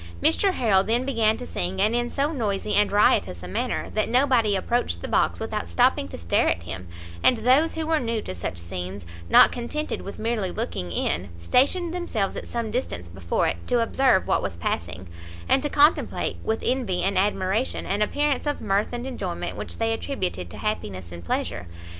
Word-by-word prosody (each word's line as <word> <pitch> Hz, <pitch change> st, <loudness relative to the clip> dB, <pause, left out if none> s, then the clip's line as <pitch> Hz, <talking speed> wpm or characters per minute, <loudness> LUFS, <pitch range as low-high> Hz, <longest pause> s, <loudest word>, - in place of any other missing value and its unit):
Mr 385 Hz, -, +3 dB
Harrel 205 Hz, -, +3 dB
then 235 Hz, +5 st, 0 dB
began 225 Hz, -5 st, +2 dB
to 250 Hz, -, -7 dB
sing, 185 Hz, -2 st, -3 dB
and 210 Hz, +3 st, +3 dB
in 240 Hz, 0 st, 0 dB
so 285 Hz, +4 st, 0 dB
noisy 210 Hz, -7 st, -1 dB
and 210 Hz, 0 st, +3 dB
riotous 145 Hz, -, +3 dB
a -, -, -6 dB
manner, 90 Hz, -, -2 dB
that 215 Hz, -, 0 dB
nobody 245 Hz, -4 st, +3 dB
approached 190 Hz, -, -1 dB
the -, -, -3 dB
box -, -, +1 dB
without -, -, -3 dB
stopping 85 Hz, +2 st, +2 dB
to 90 Hz, -, -8 dB
stare 85 Hz, +1 st, +1 dB
at 85 Hz, +2 st, -1 dB
him; 85 Hz, +2 st, -7 dB, 0.3 s
and 250 Hz, -, +5 dB
those 260 Hz, +8 st, +3 dB
who 320 Hz, -1 st, -2 dB
were 320 Hz, 0 st, +2 dB
new 230 Hz, -3 st, -1 dB
to 150 Hz, -, -6 dB
such 90 Hz, 0 st, -5 dB
scenes, 90 Hz, +2 st, -5 dB, 0.2 s
not -, -, +8 dB
contented 300 Hz, +6 st, -3 dB
with 200 Hz, -, -8 dB
merely 220 Hz, -4 st, -1 dB
looking 180 Hz, -, -4 dB
in, 85 Hz, +3 st, -1 dB
stationed 285 Hz, -, +2 dB
themselves 245 Hz, -, -2 dB
at -, -, -6 dB
some 230 Hz, -2 st, -3 dB
distance 90 Hz, -, -3 dB
before 85 Hz, -1 st, -1 dB
it, -, -, -1 dB
to 245 Hz, -, +2 dB
observe 230 Hz, -3 st, +3 dB
what -, -, +1 dB
was 95 Hz, -4 st, -4 dB
passing, 85 Hz, +2 st, -3 dB, 0.4 s
and 265 Hz, -, +3 dB
to 295 Hz, -, -1 dB
contemplate 295 Hz, +3 st, +2 dB
with 220 Hz, 0 st, -1 dB
envy 235 Hz, -9 st, 0 dB
and 195 Hz, +1 st, +1 dB
admiration 195 Hz, +4 st, 0 dB
an 200 Hz, +2 st, -1 dB
appearance 290 Hz, +5 st, 0 dB
of 290 Hz, -, -1 dB
mirth 205 Hz, +2 st, 0 dB
and 240 Hz, +1 st, -4 dB
enjoyment 195 Hz, -9 st, -4 dB
which -, -, -5 dB
they 225 Hz, 0 st, +1 dB
attributed 185 Hz, -, -3 dB
to -, -, -10 dB
happiness 100 Hz, -, -4 dB
and 85 Hz, 0 st, -8 dB
pleasure! 85 Hz, +1 st, -2 dB
210 Hz, 195 wpm, -25 LUFS, -, 0.4 s, not